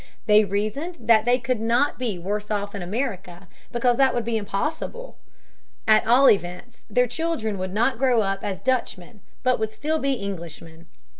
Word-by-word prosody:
They 210 Hz, -1 st, +5 dB
reasoned 215 Hz, -, -3 dB
that 225 Hz, -2 st, +4 dB
they 245 Hz, +1 st, +4 dB
could 250 Hz, -1 st, -2 dB
not 235 Hz, +6 st, +1 dB
be 230 Hz, -7 st, -2 dB
worse 205 Hz, +4 st, -4 dB
off 205 Hz, -1 st, -2 dB
in 200 Hz, -, -5 dB
America, 190 Hz, -3 st, -4 dB, 0.2 s
because 240 Hz, 0 st, +1 dB
that 265 Hz, -2 st, +3 dB
would 240 Hz, -2 st, -1 dB
be 230 Hz, -1 st, -1 dB
impossible. 305 Hz, -, -4 dB, 0.7 s
At 215 Hz, 0 st, +5 dB
all 255 Hz, +4 st, +6 dB
events, 185 Hz, +5 st, 0 dB
their 250 Hz, 0 st, +3 dB
children 245 Hz, -, -3 dB
would 185 Hz, 0 st, -3 dB
not 225 Hz, +5 st, +1 dB
grow 255 Hz, -4 st, +3 dB
up 195 Hz, -1 st, -2 dB
as 195 Hz, -2 st, -3 dB
Dutchmen, 235 Hz, -5 st, -2 dB, 0.2 s
but 255 Hz, -2 st, +2 dB
would 220 Hz, 0 st, -1 dB
still 305 Hz, +8 st, -2 dB
be 275 Hz, -3 st, 0 dB
Englishmen. 165 Hz, -4 st, -8 dB
220 Hz, 170 wpm, -24 LUFS, 200-255 Hz, 0.7 s, all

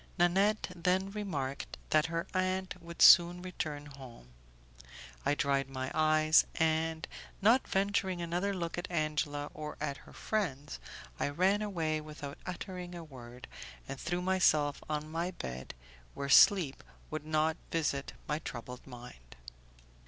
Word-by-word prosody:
Nanette 195 Hz, +4 st, +2 dB
then 185 Hz, +3 st, +1 dB
remarked 150 Hz, -10 st, -4 dB
that 155 Hz, +1 st, +4 dB
her 165 Hz, 0 st, -2 dB
aunt 185 Hz, 0 st, 0 dB
would 170 Hz, 0 st, -1 dB
soon 175 Hz, 0 st, +8 dB
return 155 Hz, -5 st, -4 dB
home; 130 Hz, -, -12 dB, 1.0 s
I 145 Hz, -, +3 dB
dried 140 Hz, -2 st, +1 dB
my 130 Hz, -1 st, -4 dB
eyes, 155 Hz, 0 st, +5 dB
and, 160 Hz, 0 st, 0 dB, 0.3 s
not 230 Hz, +6 st, +4 dB
venturing 195 Hz, -2 st, 0 dB
another 175 Hz, +4 st, -1 dB
look 175 Hz, -3 st, -3 dB
at 175 Hz, -, -6 dB
Angela 155 Hz, -3 st, -1 dB
or 150 Hz, -1 st, -6 dB
at 140 Hz, -2 st, -3 dB
her -, -, -16 dB
friends, 145 Hz, -, -3 dB, 0.4 s
I -, -, 0 dB
ran 190 Hz, +7 st, +2 dB
away 165 Hz, -7 st, -1 dB
without 150 Hz, -2 st, -8 dB
uttering 180 Hz, -1 st, -6 dB
a 170 Hz, -, -7 dB
word, 125 Hz, -4 st, -11 dB, 0.4 s
and 135 Hz, -1 st, -6 dB
threw 175 Hz, 0 st, -2 dB
myself 155 Hz, -6 st, +2 dB
on 150 Hz, 0 st, -2 dB
my 170 Hz, +2 st, -1 dB
bed, 65 Hz, -, -7 dB, 0.4 s
where 140 Hz, 0 st, -4 dB
sleep 165 Hz, -2 st, +6 dB, 0.3 s
would 155 Hz, -1 st, -3 dB
not 155 Hz, +1 st, +1 dB
visit 140 Hz, -4 st, -1 dB
my 150 Hz, 0 st, -1 dB
troubled 125 Hz, -3 st, -8 dB
mind. 120 Hz, -, -12 dB
155 Hz, 135 wpm, -32 LUFS, 145-180 Hz, 1.0 s, soon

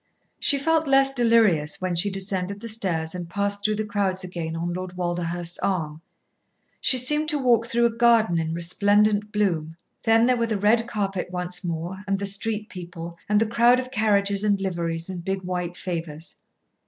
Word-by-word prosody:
She 285 Hz, -, +4 dB
felt 320 Hz, +2 st, +1 dB
less 270 Hz, 0 st, +4 dB
delirious 225 Hz, -, +3 dB
when 185 Hz, -1 st, -2 dB
she 185 Hz, +5 st, +2 dB
descended 195 Hz, 0 st, -1 dB
the 230 Hz, -, -8 dB
stairs 180 Hz, -8 st, 0 dB
and 175 Hz, -2 st, -7 dB
passed 200 Hz, +1 st, -3 dB
through 215 Hz, 0 st, +1 dB
the 215 Hz, +1 st, -3 dB
crowds 200 Hz, -2 st, -1 dB
again 170 Hz, -3 st, -5 dB
on 170 Hz, +1 st, -3 dB
Lord 180 Hz, 0 st, -6 dB
Walderhurst's 175 Hz, -1 st, -3 dB
arm. 160 Hz, -5 st, -2 dB, 0.8 s
She 260 Hz, -, +3 dB
seemed 300 Hz, +5 st, +3 dB
to 300 Hz, -, +1 dB
walk 240 Hz, -4 st, +2 dB
through 235 Hz, 0 st, +1 dB
a 235 Hz, -, +2 dB
garden 230 Hz, -6 st, +3 dB
in 160 Hz, 0 st, -2 dB
resplendent 205 Hz, +4 st, +2 dB
bloom. 170 Hz, -7 st, -1 dB, 0.3 s
Then 225 Hz, 0 st, +3 dB
there 250 Hz, 0 st, +2 dB
were 230 Hz, -1 st, 0 dB
the 220 Hz, -2 st, -1 dB
red 225 Hz, +4 st, +2 dB
carpet 195 Hz, -5 st, -3 dB
once 180 Hz, +1 st, -3 dB
more, 175 Hz, +3 st, -5 dB
and 195 Hz, 0 st, 0 dB
the 200 Hz, -, -4 dB
street 210 Hz, +2 st, -1 dB
people, 175 Hz, -4 st, -9 dB
and 210 Hz, 0 st, +3 dB
the 225 Hz, -, +2 dB
crowd 235 Hz, +3 st, +3 dB
of 255 Hz, 0 st, -6 dB
carriages 205 Hz, -4 st, +2 dB
and 205 Hz, -2 st, +1 dB
liveries, 170 Hz, -3 st, -3 dB
and 180 Hz, -2 st, -6 dB
big, 190 Hz, +1 st, -3 dB
white 180 Hz, -1 st, -4 dB
favours. 165 Hz, -3 st, -6 dB
195 Hz, 185 wpm, -24 LUFS, 175-225 Hz, 0.8 s, She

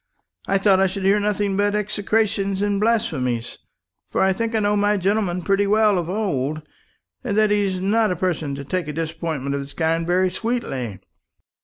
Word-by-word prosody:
I 195 Hz, -, +2 dB
thought 195 Hz, -1 st, +4 dB
I 195 Hz, -, +4 dB
should 190 Hz, +1 st, -4 dB
hear 200 Hz, +2 st, +4 dB
nothing 205 Hz, -1 st, 0 dB
but 205 Hz, +1 st, +1 dB
execrations 205 Hz, -1 st, 0 dB
and 205 Hz, -1 st, 0 dB
blasphemies; 135 Hz, -, 0 dB, 0.5 s
for -, -, -2 dB
I 190 Hz, 0 st, +4 dB
think 230 Hz, +3 st, -2 dB
I -, -, +3 dB
know 205 Hz, 0 st, +1 dB
my 205 Hz, 0 st, +2 dB
gentleman 190 Hz, -2 st, 0 dB
pretty 195 Hz, +2 st, +2 dB
well 210 Hz, -2 st, +3 dB
of 170 Hz, -1 st, -4 dB
old, 155 Hz, -7 st, -2 dB, 0.6 s
and 200 Hz, -, -2 dB
that 215 Hz, -1 st, +4 dB
he's 200 Hz, -3 st, +1 dB
not 215 Hz, +4 st, +2 dB
a 180 Hz, -, 0 dB
person 160 Hz, -5 st, -2 dB
to 140 Hz, -, -6 dB
take 180 Hz, +1 st, -2 dB
a 150 Hz, -, -4 dB
disappointment 160 Hz, -3 st, -3 dB
of 140 Hz, -, -2 dB
this 140 Hz, 0 st, -9 dB
kind 165 Hz, 0 st, 0 dB
very 185 Hz, +1 st, +2 dB
sweetly. 145 Hz, -, -3 dB
195 Hz, 185 wpm, -22 LUFS, 165-210 Hz, 0.6 s, thought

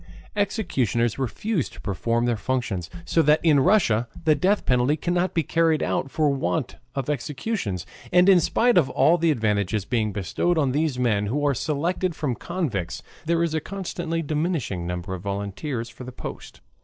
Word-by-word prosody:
Executioners 135 Hz, -, 0 dB
refuse 155 Hz, -, -1 dB
to -, -, -14 dB
perform 115 Hz, +4 st, -1 dB
their 120 Hz, -1 st, +1 dB
functions, 110 Hz, -7 st, -2 dB, 0.2 s
so 165 Hz, -, +3 dB
that 150 Hz, +1 st, +4 dB
in 150 Hz, -4 st, +6 dB
Russia 135 Hz, -, +3 dB, 0.2 s
the 155 Hz, -, +6 dB
death 195 Hz, +6 st, +1 dB
penalty 125 Hz, +4 st, +2 dB
cannot 175 Hz, +1 st, 0 dB
be 165 Hz, -, +2 dB
carried 165 Hz, 0 st, +2 dB
out 135 Hz, -, -1 dB
for 150 Hz, 0 st, +2 dB
want 140 Hz, +1 st, -2 dB, 0.2 s
of 135 Hz, -2 st, -2 dB
executioners. 140 Hz, -, -3 dB, 0.3 s
And 180 Hz, +1 st, +5 dB
in 190 Hz, -2 st, +7 dB
spite 235 Hz, +6 st, +3 dB
of 140 Hz, -, +1 dB
all 170 Hz, +2 st, +4 dB
the 165 Hz, 0 st, +3 dB
advantages 105 Hz, -, 0 dB
bestowed 110 Hz, -, 0 dB
on 140 Hz, -4 st, +2 dB
these 150 Hz, -1 st, 0 dB
men, 110 Hz, -5 st, +1 dB
who 145 Hz, +7 st, -1 dB
are 145 Hz, -, +3 dB
selected 165 Hz, +6 st, -1 dB
from 145 Hz, -5 st, -1 dB
convicts, 120 Hz, -, -3 dB, 0.2 s
there 170 Hz, 0 st, +2 dB
is 165 Hz, -2 st, -1 dB
a 160 Hz, -, 0 dB
constantly 175 Hz, -3 st, -3 dB
diminishing 150 Hz, -, -1 dB
number 90 Hz, +1 st, -4 dB
of 90 Hz, -, -5 dB
volunteers 100 Hz, -, -3 dB
for 120 Hz, +2 st, -11 dB
the 130 Hz, -, -7 dB
post. -, -, -8 dB
145 Hz, 170 wpm, -24 LUFS, 115-170 Hz, 0.3 s, in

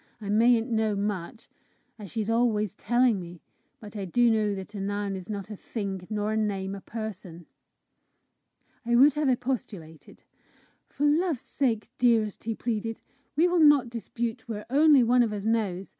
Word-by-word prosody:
I 205 Hz, -2 st, -7 dB
mayn't 230 Hz, +3 st, +3 dB
know 220 Hz, -2 st, +1 dB
much, 200 Hz, +2 st, -4 dB, 0.5 s
as 205 Hz, -3 st, -9 dB
she's 215 Hz, +1 st, -3 dB
always 225 Hz, -4 st, +1 dB
telling 240 Hz, -1 st, +2 dB
me, 175 Hz, -1 st, -9 dB, 0.4 s
but 210 Hz, -1 st, -12 dB
I 200 Hz, -2 st, -4 dB
do 235 Hz, +6 st, +3 dB
know 210 Hz, -2 st, +1 dB
that 190 Hz, +2 st, -8 dB
a 200 Hz, -, -5 dB
noun 200 Hz, 0 st, -2 dB
is 185 Hz, 0 st, -8 dB
not 205 Hz, 0 st, -5 dB
a -, -, -5 dB
thing, 195 Hz, -3 st, -5 dB
nor 210 Hz, 0 st, -1 dB
a -, -, 0 dB
name 195 Hz, -3 st, -2 dB
a 200 Hz, -, -7 dB
person!" 190 Hz, -7 st, -7 dB, 1.4 s
I 240 Hz, 0 st, +1 dB
would 275 Hz, +4 st, +6 dB
have 300 Hz, -1 st, 0 dB
expostulated. 235 Hz, -, -4 dB, 0.7 s
"For 290 Hz, -, -2 dB
love's 310 Hz, -2 st, +1 dB
sake, 230 Hz, -6 st, -1 dB
dearest," 225 Hz, -5 st, +2 dB
he 225 Hz, -1 st, -2 dB
pleaded, 225 Hz, -1 st, -3 dB, 0.4 s
"we 330 Hz, +4 st, +4 dB
will 355 Hz, -1 st, +1 dB
not 295 Hz, -6 st, +5 dB
dispute 235 Hz, +1 st, -5 dB
where 210 Hz, -2 st, -5 dB
only 290 Hz, -1 st, +6 dB
one 245 Hz, +2 st, +4 dB
of 230 Hz, -3 st, +1 dB
us 205 Hz, -1 st, -5 dB
knows! 205 Hz, -5 st, -1 dB
220 Hz, 170 wpm, -27 LUFS, 200-240 Hz, 1.4 s, would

